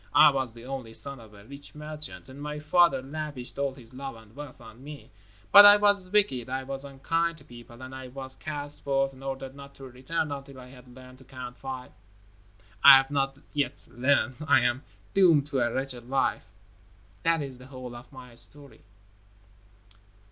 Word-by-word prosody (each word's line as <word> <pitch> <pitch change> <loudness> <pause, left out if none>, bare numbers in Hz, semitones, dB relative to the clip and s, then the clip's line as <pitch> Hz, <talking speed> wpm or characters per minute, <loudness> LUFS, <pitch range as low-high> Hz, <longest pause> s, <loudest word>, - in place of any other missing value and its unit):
I 155 - +8
was 130 -3 -2
the 115 +1 -12
only 130 -4 -6
son 140 -2 -1
of 110 -2 -15
a 100 0 -15
rich 140 +3 -10
merchant, 150 -1 -7
and 135 +2 -11
my 150 0 -5
father 155 -1 +3
lavished 145 -3 -6
all 140 -1 -1
his 125 -3 -15
love 135 -1 -6
and 110 0 -17
wealth 145 -3 -9
on 115 +1 -14
me. 145 0 -11 0.4
But 205 - +12
I 205 0 +10
was 205 -3 +2
wicked. 185 - +2
I 130 +1 -2
was 135 +1 -6
unkind 165 +5 -1
to - - -12
people, 120 0 -13
and 130 0 -9
I 130 -1 -8
was 130 +1 -8
cast 145 -1 -5
forth 135 -1 +1
and 135 0 -14
ordered 135 -1 -5
not 140 0 -12
to 135 - -13
return 135 +5 -3
until 140 -1 -7
I 125 0 -12
had 125 -1 -15
learned 130 0 -14
to - - -15
Count 125 -2 -9
Five. 130 -1 -7 0.9
I 140 -1 +12
have 135 +1 0
not 135 -1 0 0.2
yet 145 -2 -2
learned. 130 0 +1
I 140 -3 +6
am 125 +1 +1 0.3
doomed 170 -7 +5
to 135 - 0
a 120 -1 +1
wretched 130 -2 -4
life. 135 -3 0 0.8
That 165 +1 +2
is 130 -3 -8
the 125 - -13
whole 130 -2 -9
of 120 +4 -12
my 130 -2 -12
history." 140 +4 -2
135 Hz, 190 wpm, -27 LUFS, 130-145 Hz, 0.9 s, But